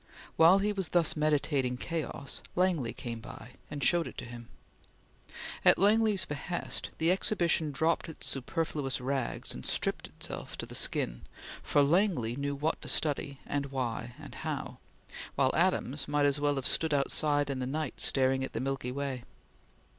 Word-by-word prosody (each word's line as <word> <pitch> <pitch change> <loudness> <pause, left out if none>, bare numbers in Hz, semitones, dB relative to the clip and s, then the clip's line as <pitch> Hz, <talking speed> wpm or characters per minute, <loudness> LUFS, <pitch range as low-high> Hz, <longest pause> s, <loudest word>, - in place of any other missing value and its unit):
While 165 +4 +7
he 205 +1 +1
was 190 -4 -1
thus 170 -3 +3
meditating 145 -4 +1
chaos, 155 -2 -3
Langley 175 -10 +1
came 115 -2 -6
by, 115 +2 -10 0.2
and 145 -2 -4
showed 170 +5 +3
it - - -10
to 125 - -5
him. 120 -1 -10 1.1
At - - +7
Langley's 210 0 +4
behest, 150 +4 -2
the 165 +2 +3
Exhibition 170 -5 +2
dropped 160 +4 0
its 160 - -5
superfluous 140 0 -1
rags 130 0 -2
and - - -8
stripped - - -1
itself - - -4
to - - -4
the - - -11
skin, - - 0 0.4
for 145 - +3
Langley 155 - +2
knew 140 +1 -2
what 150 +3 -1
to - - -8
study, 140 -2 +1
and 140 -1 -2
why, 125 -3 -3
and - - -10
how; - - -4 0.6
while 130 -1 +3
Adams 160 -6 +1
might 145 0 +2
as 140 0 +2
well 145 0 +1
have 135 -2 -3
stood 160 +1 +2
outside 145 +1 +2
in 135 - -3
the 125 - -2
night, 150 0 -3
staring 130 0 +2
at 130 - -5
the - - -2
Milky 135 -1 -2
Way. 135 -1 -3
145 Hz, 165 wpm, -30 LUFS, 130-165 Hz, 1.1 s, While